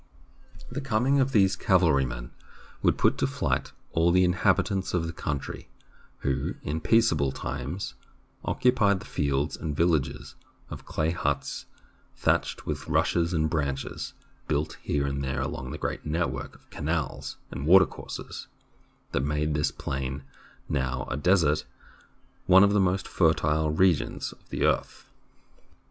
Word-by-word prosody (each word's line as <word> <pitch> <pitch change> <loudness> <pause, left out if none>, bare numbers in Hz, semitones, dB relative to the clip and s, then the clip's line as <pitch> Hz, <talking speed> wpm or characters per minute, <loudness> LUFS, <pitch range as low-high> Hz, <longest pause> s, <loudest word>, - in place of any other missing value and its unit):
The 140 +3 -3
coming 135 +2 +2
of 135 0 +2
these 100 -5 +4
cavalrymen 70 -10 +2 0.5
would - - +3
put - - +2
to - - +2
flight - - -1 0.2
all 85 +1 +3
the 90 +1 +5
inhabitants 95 +1 +1
of 85 -2 0
the 85 - -4
country, 70 -1 -4 0.5
who, 70 -1 -1
in 80 +2 -2
peaceable 80 - +3
times, 70 +9 -4 0.5
occupied 115 -6 +3
the 105 - -11
fields 70 +1 -1
and 75 -3 -4
villages 80 -6 0 0.4
of - - -8
clay 80 +1 0
huts, 70 -5 -2 0.5
thatched - - 0
with - - -4
rushes 85 0 +2
and 80 -3 +1
branches, 70 -4 -3 0.3
built 75 +1 -1
here 70 -1 0
and 70 0 -2
there 65 -1 -2
along 65 -1 -4
the 75 - -5
great - - -3
network 80 +3 -2
of - - -22
canals 80 -1 -3
and 70 +3 -4
watercourses 95 +2 +2 0.6
that - - +1
made 75 +2 0
this 75 0 +1
plain, 65 +1 -4 0.4
now 65 -2 -1
a - - 0
desert, 80 -1 +3 0.8
one 95 +1 +8
of 100 0 +4
the 105 - +4
most 95 0 +1
fertile 80 -2 +2
regions 85 0 +1
of - - -19
the - - 0
earth. - - -1
80 Hz, 140 wpm, -27 LUFS, 70-95 Hz, 0.8 s, one